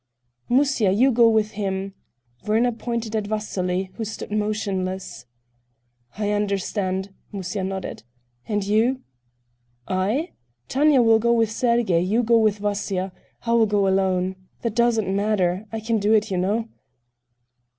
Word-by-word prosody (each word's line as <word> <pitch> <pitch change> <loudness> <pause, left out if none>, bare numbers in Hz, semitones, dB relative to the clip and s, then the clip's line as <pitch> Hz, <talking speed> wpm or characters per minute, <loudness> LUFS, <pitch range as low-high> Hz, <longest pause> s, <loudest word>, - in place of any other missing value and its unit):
"Musya, 260 -5 +3
you 250 +8 +4
go 235 -1 +5
with 215 -1 +2
him." 195 -2 -3 0.5
Werner 230 +3 +3
pointed 230 -1 -4
at 210 -2 -1
Vasily, 190 -3 -2
who 230 - -3
stood 215 -1 -6
motionless. 190 - -3 0.9
"I 210 -1 -1
understand," 200 -1 -1 0.2
Musya 195 -1 -4
nodded. 190 0 -4 0.5
"And 210 -2 0
you?" 230 +6 +2 0.9
"I? 205 - 0 0.4
Tanya 280 -1 +4
will 225 -1 +5
go 235 +1 +2
with 225 -2 +2
Sergey, 235 -7 +2
you 210 +7 +1
go 230 0 +4
with 215 -2 +2
Vasya.... 200 -2 -2 0.3
I 230 - 0
will 230 -1 +4
go 205 -1 +2
alone. 190 -1 +1 0.3
That 230 -3 -1
doesn't 235 -3 +2
matter, 200 -1 0
I 225 - -3
can 225 0 0
do 205 +2 +2
it, 215 -2 +2
you 185 - 0
know." 210 +5 0
210 Hz, 140 wpm, -23 LUFS, 190-230 Hz, 0.9 s, go